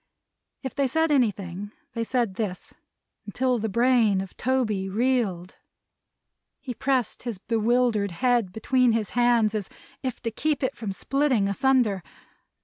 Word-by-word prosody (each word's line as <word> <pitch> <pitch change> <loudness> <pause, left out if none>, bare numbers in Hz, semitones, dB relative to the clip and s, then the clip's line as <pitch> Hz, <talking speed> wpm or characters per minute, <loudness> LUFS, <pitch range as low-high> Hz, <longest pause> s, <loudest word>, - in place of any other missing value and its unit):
If 265 - -4
they 280 -1 +1
said 320 +4 +1
anything 205 -6 0 0.2
they 230 - -2
said 235 -4 0
this, 185 -3 -4 0.5
until 250 +3 0
the 220 +1 -2
brain 235 -2 +3
of 190 -1 -6
Toby 220 -7 0
reeled. 210 -5 0 1.0
He 255 - -6
pressed 255 -4 -1
his 235 -4 -4
bewildered 225 0 +1
head 235 +1 +1
between 245 +3 +2
his 220 -3 -1
hands 240 -3 +3
as 210 -3 -3 0.3
if 255 -3 -4
to 230 - -1
keep 290 +4 -1
it 260 - 0
from 215 -4 -4
splitting 260 0 +1
asunder. 225 -2 +2
230 Hz, 140 wpm, -25 LUFS, 205-255 Hz, 1.0 s, brain